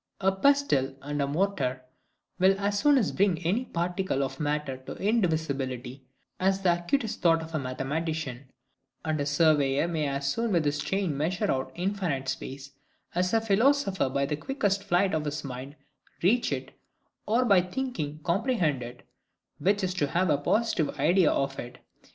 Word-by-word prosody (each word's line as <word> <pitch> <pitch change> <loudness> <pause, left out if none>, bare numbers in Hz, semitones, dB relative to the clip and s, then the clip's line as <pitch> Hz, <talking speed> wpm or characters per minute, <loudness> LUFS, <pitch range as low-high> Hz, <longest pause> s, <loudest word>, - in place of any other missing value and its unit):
A 190 0 +3
pestle 190 - +2
and 145 +1 -3
mortar 145 -8 0 0.6
will 190 +1 +4
as 200 0 0
soon 290 -2 +5 0.2
bring 195 -3 +3
any 215 +9 +1
particle 175 - -1
of 135 - -5
matter 150 -3 -1
to 130 - -9
indivisibility, 140 - -1 0.4
as 190 +1 +1
the 180 -2 +4
acutest 220 +6 -1
thought 165 -2 +4
of 160 +1 -10
a 155 - 0
mathematician; 140 +1 -3 0.6
and 155 -2 0
a 145 - -1
surveyor 145 -1 +3
may 160 -3 -1
as 140 0 -2
soon 230 +9 0
with 165 -3 +2
his 145 0 0
chain 175 +2 -1
measure 180 +8 0
out 130 0 -2
infinite 175 -7 -2
space, 135 +1 -6 0.4
as 180 +1 +1
a 225 - +4
philosopher 225 - +2
by 140 +1 0
the 150 - -1
quickest 200 - -1
flight 185 +1 +2
of 150 -1 -2
mind 135 +2 -7 0.5
reach 235 +7 +3
it - - -3 0.6
or 235 +4 +3
by 200 -6 +5
thinking 180 - -4
comprehend 170 - +1
it; 120 +1 -9 0.5
which 200 +1 +1
is 185 -1 0
to 175 -6 0
have 175 +3 +1
a 145 - +3
positive 210 -1 0
idea 175 0 +4
of 135 0 -1
it. 125 +1 -7
165 Hz, 160 wpm, -28 LUFS, 140-195 Hz, 0.6 s, soon